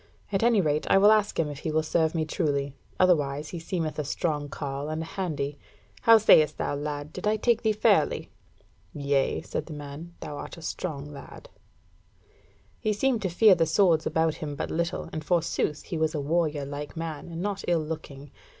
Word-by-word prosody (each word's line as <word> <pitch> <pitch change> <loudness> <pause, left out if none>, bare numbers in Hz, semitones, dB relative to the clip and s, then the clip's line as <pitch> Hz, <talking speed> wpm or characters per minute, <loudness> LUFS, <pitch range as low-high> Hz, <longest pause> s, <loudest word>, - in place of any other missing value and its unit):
At 195 - +1
any 230 -3 +4
rate, 150 -2 0
I - - +6
will 205 +2 +7
ask 215 -1 +2
him 160 - +2
if 145 -2 -6
he - - -3
will 155 +1 +1
serve 160 +1 +1
me 160 -1 0
truly. 145 -4 -1 0.3
Otherwise 150 -5 +2
he 175 - -6
seemeth 165 -2 -3
a - - 0
strong 145 0 -2
carle 140 0 -4
and 155 +1 -3
a - - -7
handy. 150 -6 -3 0.4
How 230 0 +8
sayest 155 -8 +5
thou, - - -1
lad, 145 +1 -4
did - - -4
I 215 +1 +2
take 235 +1 +2
thee 220 - +2
fairly?" 210 - +2 0.6
"Yea," 140 -2 0
said - - -4
the 160 - -7
man, 150 +4 -8
"thou 150 -1 -6
art - - -8
a 165 - -11
strong 155 -4 -4
lad." 140 - -11 1.3
He 215 -2 0
seemed 240 +2 +1
to 190 - -1
fear 205 +4 +6
the 165 -2 +2
swords 165 -1 +3
about 160 -1 +1
him 145 -2 -4
but - - -4
little, 170 +1 -2
and 155 - -4
forsooth 165 -2 0
he 165 - -4
was 160 0 0
a - - -1
warrior 150 -1 0
like 145 +3 -7
man, 160 -3 -5
and 165 0 -6
not 200 -1 -2
ill 170 -3 +2
looking. 145 -3 -7
160 Hz, 200 wpm, -27 LUFS, 145-180 Hz, 1.3 s, How